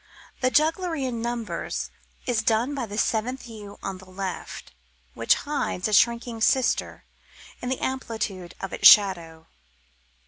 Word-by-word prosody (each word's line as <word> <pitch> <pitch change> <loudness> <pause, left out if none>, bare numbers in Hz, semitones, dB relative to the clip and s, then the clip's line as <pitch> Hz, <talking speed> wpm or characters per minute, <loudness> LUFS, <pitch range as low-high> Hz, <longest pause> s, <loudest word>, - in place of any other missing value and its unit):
The 255 - +2
jugglery 320 +1 +1
in 235 -3 -3
numbers 235 -1 -3 0.3
is 240 -3 +1
done 225 +5 +1
by 260 -5 -3
the 205 0 -7
seventh 240 +5 -1
yew 210 -3 -10
on 190 -1 -4
the 190 0 -15
left, 185 0 -6 0.4
which - - +3
hides 285 -10 -2
a 215 - -3
shrinking 235 +1 +2
sister 260 +3 +1 0.6
in 250 - -3
the 260 - -1
amplitude 220 -8 -4
of 195 - -5
its - - +7
shadow. 170 -6 +5
230 Hz, 140 wpm, -25 LUFS, 200-255 Hz, 0.6 s, its